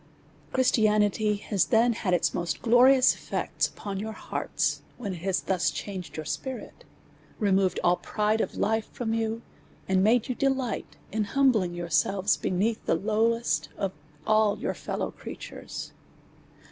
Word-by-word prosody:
Christianity 215 -4 +3
has 200 -2 0
then 235 +1 +4
had 205 -4 -2
its 175 - +1
most 170 -3 -3
glorious 255 +2 +6
eftects - - -2
upon 200 -2 -6
your 220 +2 -4
hearts, - - -2 0.2
when 205 -6 -4
it - - -6
has 190 +2 0
thus 185 -2 +1
changed 190 -5 -6
your 155 - -4
spirit^ 260 - -4 0.7
removed 195 -3 +2
all 175 +1 +4
the - - -26
pride 215 +1 0
of - - -3
life 220 +1 0
from 225 -2 -3
you, 225 0 -1 0.4
and 190 0 +3
made 230 +3 +3
you 255 - -1
delight 265 -1 -1
in 215 -1 0
humbling* 220 -8 +2
yourselves 175 +4 +1
beneath 210 +5 -1
the - - +3
lowest 225 +3 +1
of 195 -2 -1 0.3
all 215 -1 +3
your - - -2
fellow - - -4
creatures. - - -8
215 Hz, 145 wpm, -27 LUFS, 190-230 Hz, 0.7 s, glorious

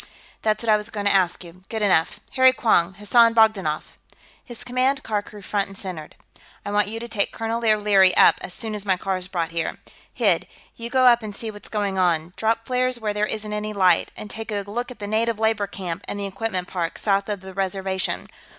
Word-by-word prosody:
"That's 215 +1 0
what 230 - -2
I 215 - +6
was 210 +1 -4
going 205 -2 -4
to 200 - +4
ask 185 -2 +2
you. 175 +1 -14
Good 220 -2 -2
enough. 180 -5 +2
Harry 260 -1 +5
Quong, 190 -7 +2
Hassan 230 +3 +4
Bogdanoff!" 205 -9 +2 0.4
His 240 -2 -10
command 255 +2 0
car 210 -1 -1
crew 205 0 -13
front 200 0 -1
and 195 0 -10
centered. 175 -6 -7 0.5
"I 205 - -3
want 205 0 +2
you 225 +2 -4
to 235 - -6
take 210 -4 -1
Colonel 225 +1 -3
O'Leary 205 -4 +4
up, - - +6
as - - -6
soon 220 +3 -5
as 210 -2 -4
my 190 -2 +1
car's 185 -1 -3
brought 170 -3 -2
here.... 165 0 -2 0.3
Hid, - - +1 0.3
you 235 0 -6
go 260 0 +3
up 240 -1 +6
and 210 -2 -6
see 225 +1 -5
what's 205 -1 -12
going 200 -3 -1
on. 170 -1 +1
Drop 225 +1 0
flares 255 -1 0
where 215 -2 -2
there 210 +1 0
isn't 215 -1 -4
any 210 0 -3
light. 185 -4 +3
And 210 - -7
take 225 0 -7
a 205 -1 -2
look 240 +5 -4
at 250 - -10
the 205 - -6
native 220 +2 0
labor 220 -2 +1
camp 180 -4 -6
and 205 - -4
the 200 - -2
equipment 195 -2 -3
park, 170 -3 -3
south 200 0 0
of 205 -3 -3
the 190 0 -10
reservation.... 190 0 -2
205 Hz, 225 wpm, -23 LUFS, 190-225 Hz, 0.5 s, I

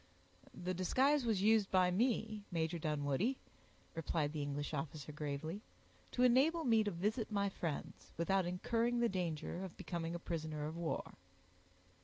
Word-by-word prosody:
"The 180 +1 -2
disguise 260 +10 +3
was 205 -4 +2
used 215 -2 +5
by 185 -1 +4
me, 220 +1 +1
Major 165 0 0
Dunwoodie," 150 - 0 0.6
replied 155 -2 -1
the 155 - -2
English 145 +1 -3
officer, 150 0 -4
gravely, 150 +5 -4 0.5
"to 250 - +2
enable 275 +7 +5
me 225 -4 +4
to 210 - 0
visit 210 +6 -1
my 200 -1 +1
friends, 165 -6 -5
without 180 +2 +2
incurring 230 +7 +1
the 235 -1 +3
danger 175 -1 -2
of 190 - -7
becoming 170 -1 -3
a - - -1
prisoner 155 -3 -3
of 155 +2 -4
war." 170 -1 -3
180 Hz, 150 wpm, -37 LUFS, 160-220 Hz, 0.6 s, used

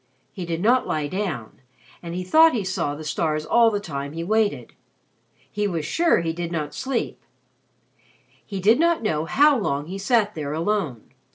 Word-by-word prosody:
He 185 - -6
did 165 0 -2
not 245 +5 +3
lie 155 -1 -1
down, 150 - -4 0.4
and 170 0 -6
he 185 - -3
thought 320 - +5
he 215 - -1
saw 185 -6 -2
the 155 - -8
stars 155 0 -1
all 235 +4 +5
the 205 -2 -1
time 140 -6 -6
he 165 +1 -4
waited. 215 +3 0 0.8
He 210 0 -1
was 165 -5 -3
sure 335 - +2
he 165 -1 -2
did 170 0 -4
not 155 -3 -3
sleep. 260 -3 -3 1.2
He 195 -2 -6
did 220 +7 +4
not 340 -4 +2
know 155 -7 0
how 290 - +4
long 145 -8 -1
he 190 +4 -6
sat 210 0 +2
there 150 -2 -4
alone. 165 - -2
180 Hz, 180 wpm, -23 LUFS, 155-215 Hz, 1.2 s, thought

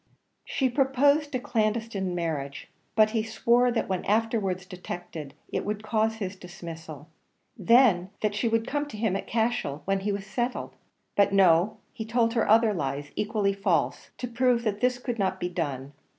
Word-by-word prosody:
She 265 - 0
proposed 280 +3 +2
a - - +1
clandestine 215 -5 -1
marriage, 150 -5 -3 0.3
but 215 -1 +5
he 225 -1 +1
swore 235 +3 +2
that 235 - -1
when 185 -2 -2
afterwards 210 -4 0
detected, 175 -5 -7 0.2
it - - 0
would 210 0 -3
cause 220 0 +1
his 200 -3 -4
dismissal; 165 -5 -9 0.5
then 230 -7 +4
that 215 -1 +1
she 215 +3 0
would 225 0 +1
come 290 +3 -2
to 255 - -8
him 210 -3 0
at 195 - -4
Cashel, 220 -11 -1
when 195 0 +1
he 205 +2 -1
was 200 -1 -3
settled; 240 +5 -3 0.4
but 200 -1 +4
no, 185 0 +4 0.2
he 220 - -5
told 230 0 +1
her 230 -3 +1
other 220 0 +5
lies 145 -3 -3
equally 205 -1 0
false, 195 0 0
to 250 - -4
prove 245 0 +2
that 210 -2 -1
this 250 0 +2
could 245 -2 -4
not 190 -1 0
be 180 - -2
done. 145 -6 -4
215 Hz, 175 wpm, -27 LUFS, 180-235 Hz, 0.5 s, but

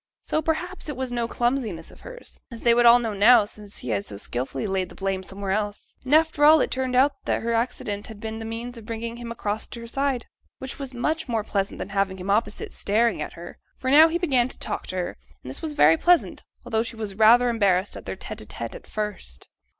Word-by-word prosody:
So 310 - 0
perhaps 325 +2 -2
it 290 - -5
was 260 -1 -3
no 240 -1 -1
clumsiness 240 -9 -1
of - - -17
hers, - - -8
as 235 -3 -9
they 235 - +5
would 240 0 +5
all 235 +1 +9
know, 230 -3 -2
now, 210 +2 +6
since 205 -1 -8
he 125 - -7
had 100 -3 0
so 100 - -7
skilfully 125 - -3
laid 190 -2 -1
the - - -13
blame 195 -1 -2
somewhere 195 +1 -5
else; 205 0 -3
and 265 +3 +3
after 315 -2 +3
all 310 +1 +8
it - - 0
turned 260 -1 -1
out 270 +3 +5
that - - 0
her 230 0 0
accident 220 -3 -2
had 220 -3 -10
been 220 0 -5
the - - -6
means 230 +2 -5
of 220 - -13
bringing 230 0 -4
him 240 -1 -7
across 215 -2 -3
to 235 - -8
her 230 - -8
side, 270 0 -1 0.3
which 265 +2 -7
was 275 -2 -5
much 305 +6 -1
more 225 -3 0
pleasant 200 -2 -2
than - - -5
having 195 -1 0
him 190 +2 -3
opposite, 210 0 -1
staring 220 -3 +1
at - - -5
her; 170 +1 -10 0.2
for 260 - -1
now 310 +3 +9
he 330 +1 0
began 270 -9 +2
to - - -8
talk - - -5
to - - -5
her, 180 -1 -3 0.3
and - - -8
this - - -6
was 315 -2 -3
very 160 - +6
pleasant, 350 - +3 0.2
although 225 -2 +1
she 230 0 -4
was 215 -3 -4
rather 225 +4 +6
embarrassed 200 -5 +2
at - - -9
their - - -3
tete - - -7
a - - -8
tete - - -5
at - - -11
first. 205 - -5
230 Hz, 245 wpm, -25 LUFS, 200-255 Hz, 0.3 s, all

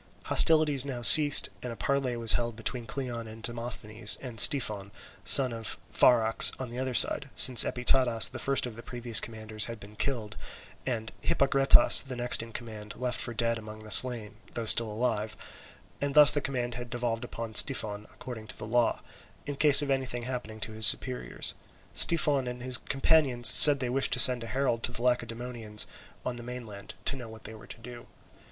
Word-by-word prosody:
Hostilities 155 -4 +2
now 130 -4 -9
ceased, 145 +3 +6
and 125 - -8
a - - -10
parley 135 -1 -4
was 115 -1 0
held 120 -1 -4
between 115 +1 -7
Cleon 120 -2 -8
and 110 0 -15
Demosthenes 115 -2 -1
and 120 -4 -8
Styphon, 105 -9 +3 0.3
son 130 -3 +5
of 115 -2 -7 0.2
Pharax, 115 -2 +3
on 130 -3 -9
the 120 - -9
other 130 -1 -6
side; 135 - +1
since 125 -2 +7
Epitadas, 125 -2 -1
the - - -10
first 135 -1 -1
of 120 -3 -10
the 115 - -12
previous 120 -2 -3
commanders, 110 -2 -4
had 115 -1 -10
been 105 +1 -15
killed, 110 -3 -6 0.5
and 115 -3 -6
Hippagretas, 135 0 +3
the 130 -2 -10
next 120 0 0
in 115 0 -12
command, 105 -3 -11
left 125 -2 -5
for - - -4
dead 115 0 -3
among 110 0 -13
the 110 - -12
slain, 115 -5 +6 0.2
though 115 - -6
still 115 +1 +2
alive, 110 -1 -5 0.6
and 140 0 -5
thus 150 -1 +7
the 145 - -3
command 125 -3 -6
had 120 0 -9
devolved 120 -1 -6
upon 115 -2 -10
Styphon 105 -5 0
according 110 -2 -13
to - - -9
the - - -9
law, 120 +2 -3 0.4
in 145 - -7
case 145 0 +5
of 140 - -5
anything 130 -3 -5
happening 120 -3 -8
to 110 - -3
his 110 -1 +2
superiors. 60 -8 -1 0.4
Styphon 145 -6 +3
and 125 0 -9
his 125 -2 -3
companions 135 -3 0
said 145 -2 +7
they 130 - -4
wished 135 +2 0
to - - 0
send 125 -2 +3
a - - -10
herald 130 -2 -4
to 125 - 0
the 120 -1 -8
Lacedaemonians 115 -3 -2 0.4
on 125 -1 -6
the - - -11
mainland, 120 -4 -11
to - - -2
know 120 -4 -12
what 110 0 -15
they 110 - -10
were 110 - -16
to - - -13
do. 120 +1 -14
120 Hz, 190 wpm, -25 LUFS, 110-130 Hz, 0.6 s, since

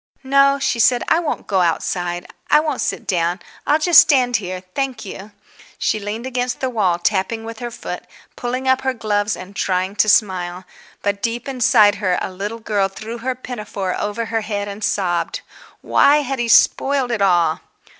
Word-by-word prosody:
"No," 275 +1 +4
she 260 -3 -1
said, 240 +1 +4
"I 325 - +4
won't 325 -4 -3
go 190 -2 +1
outside. 175 +1 -1 0.2
I - - +6
won't 300 -3 -2
sit - - -2
down. 175 0 0 0.3
I'll 295 - +4
just 320 0 +7
stand 250 -5 +3
here, 185 -2 -6
thank 270 -4 -3
you." 195 +2 -9 0.5
She 215 - 0
leaned 210 +4 -5
against 250 -1 -2
the 260 -1 -2
wall, 190 -7 +1
tapping 195 +5 -1
with 225 -1 -8
her 240 - -4
foot, 235 - -7 0.3
pulling 255 +2 -3
up 260 0 +3
her 265 -1 -1
gloves 210 -2 -1
and 190 +2 -10
trying 185 +1 -1
to 215 - +4
smile. 185 -3 +1 0.4
But 200 0 -1
deep 235 +3 -3
inside 240 -5 +4
her 185 -3 +1
a - - -4
little 205 +4 -5
girl 210 -3 0
threw 220 +4 -8
her 255 +2 -2
pinafore 210 -7 -5
over 210 +3 -2
her 225 0 -2
head 205 -1 -3
and 200 +1 -7
sobbed. 175 -5 -1 0.4
Why 295 +1 +4
had 270 -1 -3
he 240 - 0
spoiled 270 +2 +3
it 220 -3 -1
all? 175 -4 +3
220 Hz, 185 wpm, -19 LUFS, 195-255 Hz, 0.5 s, just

